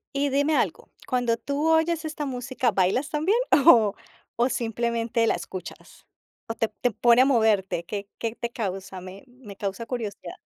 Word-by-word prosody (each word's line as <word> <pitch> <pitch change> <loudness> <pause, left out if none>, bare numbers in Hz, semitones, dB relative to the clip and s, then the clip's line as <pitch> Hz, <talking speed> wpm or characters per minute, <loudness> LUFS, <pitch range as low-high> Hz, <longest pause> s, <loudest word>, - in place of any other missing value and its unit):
Y 280 0 +1
dime 285 +3 +2
algo, - - -1 0.2
cuando 245 -3 +1
tú 285 +5 -2
oyes 320 0 +2
esta 305 -1 -4
música, 255 -1 -1
¿bailas 195 +9 +1
también 325 +8 +1 0.3
o 215 -4 +6 0.4
o 240 +1 +2
simplemente 230 -1 -1
la - - +2
escuchas? 185 -1 -9 0.4
¿O 225 - -3
te 225 0 -1
te 240 +3 -2
pone 240 +4 +5
a - - +2
moverte? 220 -9 +2
¿Qué 200 +2 -6
qué 230 -1 -3
te 235 0 -4
causa? 195 -4 -5
Me 185 +2 -10
me 245 -5 -13
causa 200 +3 -4
curiosidad. 230 -5 -5
235 Hz, 165 wpm, -25 LUFS, 210-270 Hz, 0.4 s, o